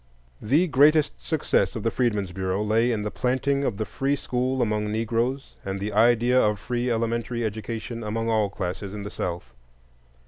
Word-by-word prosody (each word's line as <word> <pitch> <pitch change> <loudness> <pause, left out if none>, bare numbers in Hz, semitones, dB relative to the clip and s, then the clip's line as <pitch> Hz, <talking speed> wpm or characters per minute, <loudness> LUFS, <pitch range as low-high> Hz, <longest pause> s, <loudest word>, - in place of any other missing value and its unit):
The 145 +11 +3
greatest 145 - +4
success 60 - 0
of - - -4
the - - +1
Freedmen's 105 -7 0
Bureau 95 +2 -1
lay 115 +3 +2
in 110 -3 -1
the 105 - -3
planting 135 +2 0
of 110 -7 -1
the 110 - -2
free 135 +5 -1
school 130 -1 -1
among 105 -1 -1
Negroes, 115 +4 -1
and 95 0 -3
the 105 +1 -3
idea 120 +3 +4
of 105 -1 +2
free 125 +3 -2
elementary 115 0 -1
education 115 +2 -4
among 115 +2 -2
all 110 -3 +2
classes 95 +1 -5
in 105 - -5
the 105 - -6
South. 85 -1 -4
115 Hz, 175 wpm, -25 LUFS, 105-125 Hz, -, greatest